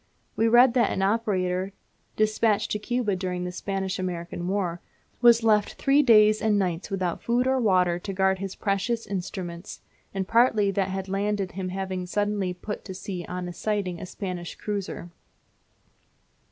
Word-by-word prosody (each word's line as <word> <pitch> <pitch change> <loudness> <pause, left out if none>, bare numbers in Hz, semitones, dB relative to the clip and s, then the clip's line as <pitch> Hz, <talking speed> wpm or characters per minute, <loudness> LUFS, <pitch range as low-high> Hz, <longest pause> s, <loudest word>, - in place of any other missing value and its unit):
We 225 - +2
read 240 +2 +6
that 245 -2 +3
an 190 - -1
operator, 195 -3 0 0.4
despatched 215 0 +1
to 210 - 0
Cuba 230 -2 -1
during 180 -1 -3
the 180 - -3
Spanish 195 +1 -3
American 175 -1 -4
War 180 -3 -1 0.4
was 235 -1 +6
left 210 -2 +3
three 275 +2 +3
days 215 -5 +5
and 215 -2 +2
nights 180 -2 -1
without 185 -3 -2
food 240 +2 +1
or 260 0 +2
water 180 -6 +2
to 195 - -5
guard 190 0 +1
his 195 -1 -5
precious 215 +4 -1
instruments, 185 -2 -6 0.3
the 195 -1 -2
party 220 -1 +3
that 195 -1 0
had 190 0 -4
landed 200 0 -1
him 185 -1 -4
having 185 -1 -4
suddenly 205 -1 0
put 180 +4 -6
to 190 - -7
sea 180 -2 -5
on 180 -1 -4
sighting 195 -4 -2
a - - -6
Spanish 180 -3 -5
cruiser. 200 -4 -5
195 Hz, 160 wpm, -26 LUFS, 185-215 Hz, 0.4 s, read